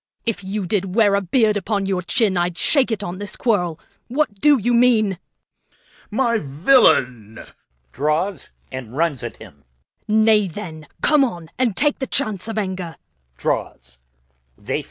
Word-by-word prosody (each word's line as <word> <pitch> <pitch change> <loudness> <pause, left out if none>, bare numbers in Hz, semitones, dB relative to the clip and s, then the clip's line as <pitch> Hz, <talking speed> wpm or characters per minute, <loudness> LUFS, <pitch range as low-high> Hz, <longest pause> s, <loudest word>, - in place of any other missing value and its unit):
If 230 -4 -2
you 195 +1 -3
did 190 0 -2
wear 215 -3 +4
a 200 - +2
beard 210 +2 +2
upon 200 0 -2
your 190 -2 -1
chin, 200 +1 +1
I'ld 175 0 -1
shake 275 - +2
it 215 -3 -2
on 180 0 -5
this 205 0 -4
quarrel. 175 -9 0 0.3
Reg. 255 - -7
What 210 -11 0
do 295 -1 +6
you 240 +1 0
mean? 225 -6 +3
Corn. - - -43 0.3
My 235 +1 +1
villain! 135 - +2 0.5
Draw 155 - 0 0.4
and 130 -2 -6
fight. - - -14
1. 160 0 0
Serv. - - -8 0.5
Nay, 215 -1 +4
then, 160 -4 -8 0.2
come 300 -2 +5
on, 170 -10 -4
and 240 -6 +1
take 295 -1 +2
the 265 - -3
chance 215 -8 -1
of 225 - -5
anger. 185 -5 -3 0.5
Reg. - - -1
200 Hz, 155 wpm, -21 LUFS, 175-230 Hz, 0.5 s, do